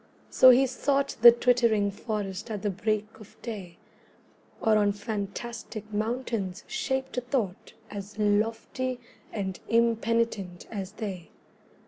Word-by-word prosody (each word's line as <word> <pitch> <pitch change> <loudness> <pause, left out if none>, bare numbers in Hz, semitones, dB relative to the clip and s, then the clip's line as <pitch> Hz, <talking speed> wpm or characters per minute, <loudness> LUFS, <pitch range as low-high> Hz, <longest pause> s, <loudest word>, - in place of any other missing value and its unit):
So 255 - +8
he 255 +2 +7
sought 275 +2 0
The 235 0 +12
twittering 235 -4 +3
forest 205 -1 -4
at 210 -2 -4
the 205 - +1
break 210 +2 -1
of 215 -1 -15
day, 195 -7 -6 0.8
Or 220 -1 +3
on 205 -1 +3
fantastic 215 +1 -5
mountains 215 -3 -2
shaped 265 -13 -2
a - - -8
thought 235 -7 -3 0.2
As 205 +1 -7
lofty 225 +4 0 0.3
and 190 -3 -3
impenitent 230 -5 +1
as 200 -2 -5
they. 195 -6 -6
215 Hz, 120 wpm, -28 LUFS, 200-235 Hz, 0.8 s, The